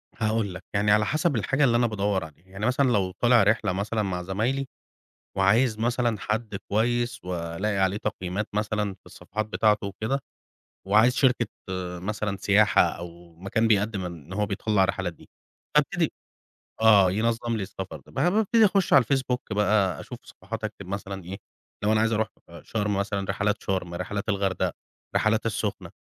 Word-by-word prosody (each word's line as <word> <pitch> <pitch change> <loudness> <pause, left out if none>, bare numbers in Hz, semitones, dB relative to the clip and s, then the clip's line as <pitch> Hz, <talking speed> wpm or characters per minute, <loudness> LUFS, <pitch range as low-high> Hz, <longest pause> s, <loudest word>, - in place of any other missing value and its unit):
هاقول 110 -3 0
لك، - - -9
يعني 105 +1 +2
على 105 +1 +4
حسب 155 - +1
الحاجة 135 +6 +1
اللي 120 -3 +4
أنا 120 0 +3
بادور 100 -3 0
عليها، 80 +4 -17
يعني 100 +3 -5
مثلًا 130 +1 +2
لو 95 -5 +1
طالع 120 +3 +4
رحلة 105 -3 +2
مثلًا 105 +3 -1
مع 90 -2 -3
زمايلي 120 +9 -1 0.7
وعايز 110 +4 +3
مثلًا 120 -2 0
حد 110 -1 -2 0.2
كويس 120 +2 0
وألاقي 90 +3 -2
عليه 95 +1 +2
تقييمات 95 +1 -3
مثلًا 105 -1 -1
في - - -25
الصفحات 110 0 -5
بتاعته 105 -1 +1
وكده، 110 +7 -2 0.7
وعايز 110 +5 +5
شركة 125 -3 +3 0.5
مثلًا 105 +1 -3
سياحة 105 +2 +4
أو 85 -1 -4
مكان 100 +6 0
بيقدم 100 -3 +1
إن 85 0 -8
هو 105 +1 0
بيطلّع 100 0 +1
الرحلات 95 -2 -1
دي - - -19 0.5
هابتدي - - +2 0.7
آه 100 -4 +6
ينظم 115 +2 0
لي 105 - -2
السفر، 95 0 -6
ب - - -16
بابتدي 215 - +3
أخش 195 -2 +2
على 135 -3 +7
Facebook 130 0 0
بقى 100 -4 +2
أشوف - - -8
صفحات 110 +4 -8
أكتب 100 -3 -6
مثلًا 100 -1 -5
إيه، 95 +2 -6 0.5
لو 105 - +3
أنا 110 - +3
عايز 115 0 +2
أروح 110 0 +1 0.2
أ - - -12
شرم 105 -2 -1
مثلًا، 100 -1 -2
رحلات 105 +1 0
شرم، 90 -3 -2
رحلات 100 +4 -4
الغردقة، 100 -3 0 0.4
رحلات 110 +1 +2
السخنة، 105 -2 -3
105 Hz, 165 wpm, -26 LUFS, 95-115 Hz, 0.7 s, على